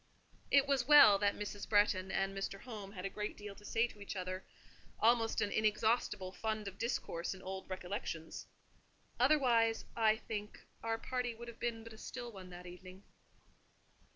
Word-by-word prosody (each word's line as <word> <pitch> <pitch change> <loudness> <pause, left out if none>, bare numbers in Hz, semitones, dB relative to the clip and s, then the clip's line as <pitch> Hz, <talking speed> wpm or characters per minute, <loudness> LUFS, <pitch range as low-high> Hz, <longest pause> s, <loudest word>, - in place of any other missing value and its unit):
It 280 -1 +6
was 275 -3 +1
well 285 -10 +9
that 205 0 +2
Mrs. 205 0 -6
Bretton 205 -3 +3
and 195 0 -1
Mr. 195 0 -4
Home 210 -5 -8
had 185 -2 -6
a - - +1
great 210 +1 -4
deal 205 -1 -7
to 205 - -17
say 225 +2 +2
to 210 -3 -10
each 200 - -6
other—almost 215 +5 -1
an 205 - 0
inexhaustible 215 -2 +1
fund 215 +1 -3
of 195 0 -8
discourse 190 -7 -2
in 185 - -12
old 190 0 -6
recollections; 185 -3 -5 0.7
otherwise, 245 -5 +4
I 220 -1 +4
think, 210 -1 -6 0.2
our 225 0 -1
party 245 0 -2
would 235 +1 -8
have 235 - -12
been 230 -2 -2
but 230 0 -10
a 220 - -13
still 240 -1 -6
one 190 -3 -10
that 180 0 -10
evening. 185 +2 -11
210 Hz, 170 wpm, -35 LUFS, 195-230 Hz, 0.7 s, well